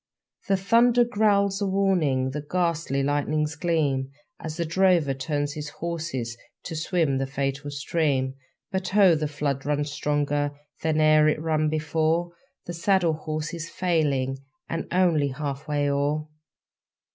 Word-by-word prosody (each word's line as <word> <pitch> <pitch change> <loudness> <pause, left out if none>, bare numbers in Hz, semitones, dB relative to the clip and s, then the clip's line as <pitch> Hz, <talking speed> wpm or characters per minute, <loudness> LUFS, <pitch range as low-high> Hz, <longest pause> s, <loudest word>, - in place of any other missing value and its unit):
The 195 -1 +3
thunder 235 +5 +4
growls 205 -3 +2
a 200 - +1
warning, 175 -10 +1
The 150 +2 -4
ghastly 165 -3 -1
lightnings 150 +2 0
gleam, 150 -6 0 0.3
As 155 -1 -6
the 170 - -1
drover 170 -4 +3
turns 145 +1 -2
his 150 -1 -5
horses 160 -9 -4 0.3
To 165 - -6
swim 160 -4 0
the 135 - -1
fatal 140 +1 -3
stream. 140 -2 0 0.4
But, 190 0 -3
oh! 195 -4 +7
the 155 -1 0
flood 145 -2 -2
runs 145 0 -1
stronger 145 0 0 0.3
Than 160 -1 +1
e'er 155 0 +5
it 155 - +2
ran 155 -1 +1
before; 160 +2 0 0.3
The 175 - -5
saddle 175 -1 +2
horse 155 0 -4
is 170 -1 -5
failing, 145 -7 0 0.3
And 165 - -3
only 170 -5 +3
half 140 +1 -5
way 145 -1 0
o'er! 145 +2 0
155 Hz, 145 wpm, -25 LUFS, 145-170 Hz, 0.4 s, oh